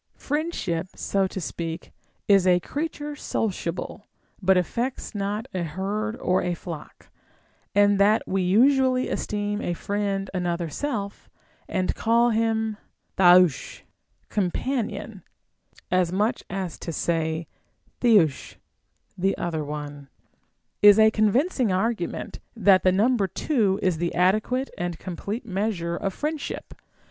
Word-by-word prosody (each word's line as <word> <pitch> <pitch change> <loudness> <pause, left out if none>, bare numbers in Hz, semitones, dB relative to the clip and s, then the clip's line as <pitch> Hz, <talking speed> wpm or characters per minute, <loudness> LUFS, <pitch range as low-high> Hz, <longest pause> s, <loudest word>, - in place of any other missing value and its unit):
Friendship 280 - -2
(so 195 -1 0
to 190 - -6
speak) 165 +1 -5 0.4
is 195 -2 +5
a 180 -1 +5
creature 295 - -4
sociable, 195 -5 -3 0.3
but 190 0 +4
affects 240 +10 -2
not 205 +1 -3
a 185 - -2
herd 195 +7 -3
or 185 -7 +1
a 180 -1 -1
flock; 165 -2 -10 0.6
and 205 0 +4
that 210 +2 +4
we 195 0 0
usually 255 +7 +3
esteem 205 0 -2
a 175 - -2
friend 200 0 -2
another 175 -2 -2
self, 210 - -4 0.4
and 185 -1 0
call 235 +2 +3
him 220 -1 0 0.4
ήαΐρος 180 -5 +5 0.5
(companion) 215 +5 -2 0.7
as 180 -2 +2
much 210 +5 0
as 185 -3 -4
to 170 - -5
say 160 0 -1 0.6
ίτεοης 205 - +3 0.6
(the 195 +2 0
other 165 -3 -2
one), 145 -1 -7 0.7
is 205 0 +8
a 220 0 +6
convincing 235 - +2
argument 190 0 -2 0.2
that 200 -4 +5
the 185 - +4
number 210 +2 +2
two 205 - +1
is 180 -4 +1
the 170 0 -2
adequate 215 +9 +1
and 175 -1 -3
com 180 +1 -6
plete 215 +8 -5
measure 190 -4 -2
of 195 - -2
friendship. 300 +8 -4
195 Hz, 125 wpm, -25 LUFS, 175-225 Hz, 0.7 s, is